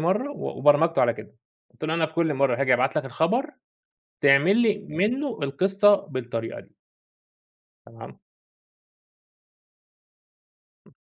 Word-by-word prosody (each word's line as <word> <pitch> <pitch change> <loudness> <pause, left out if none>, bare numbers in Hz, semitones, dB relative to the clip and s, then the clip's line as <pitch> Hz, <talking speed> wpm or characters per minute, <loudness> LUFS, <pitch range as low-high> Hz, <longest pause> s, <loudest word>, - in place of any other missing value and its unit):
مرّة" 200 - -1
و - - -5
وبرمجته 150 +4 +3
على 120 -2 +2
كده، 110 +2 -13 0.4
قلت - - -10
له: 155 +1 -1
"أنا 165 -1 +1
في 160 - -16
كل 165 -2 0
مرّة 135 -2 0
هاجي 130 -2 +3
أبعت 130 +4 0
لك 150 - 0
الخبر، 165 - -1 0.8
تعمل 145 +9 +4
لي 210 -4 +1
منّه 235 - -2
القصّة 195 +9 +3
بالطريقة 120 - -6
دي." - - -19 1.1
تمام. 115 0 -13 2.7
امم. - - -25
155 Hz, 125 wpm, -24 LUFS, 130-200 Hz, 2.7 s, تعمل